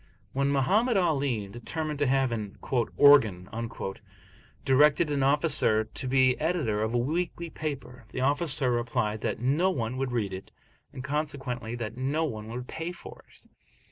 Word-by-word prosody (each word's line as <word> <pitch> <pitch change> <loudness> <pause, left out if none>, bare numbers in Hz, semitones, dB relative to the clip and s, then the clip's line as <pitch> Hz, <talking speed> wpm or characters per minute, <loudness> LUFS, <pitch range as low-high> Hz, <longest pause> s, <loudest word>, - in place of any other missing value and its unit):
When 140 +1 +1
Mohammed 200 - +2
Ali, 140 - 0
determining 150 +8 -4
to 145 -1 +1
have 135 -1 +2
an 105 -3 -5 0.4
"organ," 110 -11 +6 1.2
directed 150 +3 +4
an 140 -1 0
officer 140 -6 +3
to 110 +4 -6
be 130 -1 +3
editor 150 -10 0
of 110 +2 -1
a - - +4
weekly 165 +5 -2
paper, 125 -6 -6
the 130 - -4
officer 140 -1 +1
replied, 115 -3 -1
that - - -2
no 145 +10 +2
one 125 -7 -2
would 135 -1 -2
read 110 -6 -1
it, 95 +1 -8 0.4
and 130 - -8
consequently 135 -5 -3
that 115 -1 -5
no 140 +5 0
one 110 -7 -5
would 125 +2 -6
pay 165 +2 -5
for 175 - -12
it. - - -21
135 Hz, 155 wpm, -28 LUFS, 120-150 Hz, 1.2 s, organ